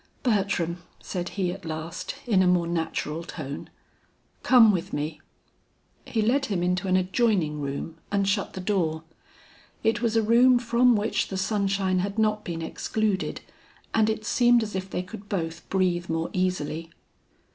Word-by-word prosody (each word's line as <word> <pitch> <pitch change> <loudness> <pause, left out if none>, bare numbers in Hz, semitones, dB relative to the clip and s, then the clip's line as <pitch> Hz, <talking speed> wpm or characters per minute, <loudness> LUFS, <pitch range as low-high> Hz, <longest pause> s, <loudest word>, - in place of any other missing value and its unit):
"Bertram," 195 - 0 0.2
said 175 -2 -4
he 185 -3 +1
at 195 +1 -8
last 160 +2 -5
in 210 -6 +3
a 185 - +4
more 180 -1 +3
natural 165 -1 -2
tone, 145 -4 -7 0.7
"come 235 -4 +7
with 185 0 -3
me." 150 +2 -3 0.8
He 220 -2 0
led 270 +5 +2
him 185 -4 -1
into 180 +2 0
an 185 0 +3
adjoining 185 -6 +1
room 140 +4 -5
and 200 -1 +1
shut 200 0 0
the 190 - -5
door. 170 -5 0 0.8
It 225 +1 +2
was 230 -2 +1
a 225 - +3
room 245 +3 +6
from 240 +1 +3
which 210 +1 0
the 190 - -4
sunshine 195 -2 +1
had 200 +3 -2
not 215 -1 +1
been 165 -1 -4
excluded 205 +3 -1 0.5
and 220 -1 +3
it 220 0 -2
seemed 240 0 +4
as 215 - -5
if 190 0 -3
they 180 - -2
could 205 +1 -10
both 165 -3 -3
breathe 180 -3 0
more 165 0 -1
easily. 165 -3 -1
190 Hz, 160 wpm, -26 LUFS, 170-215 Hz, 0.8 s, come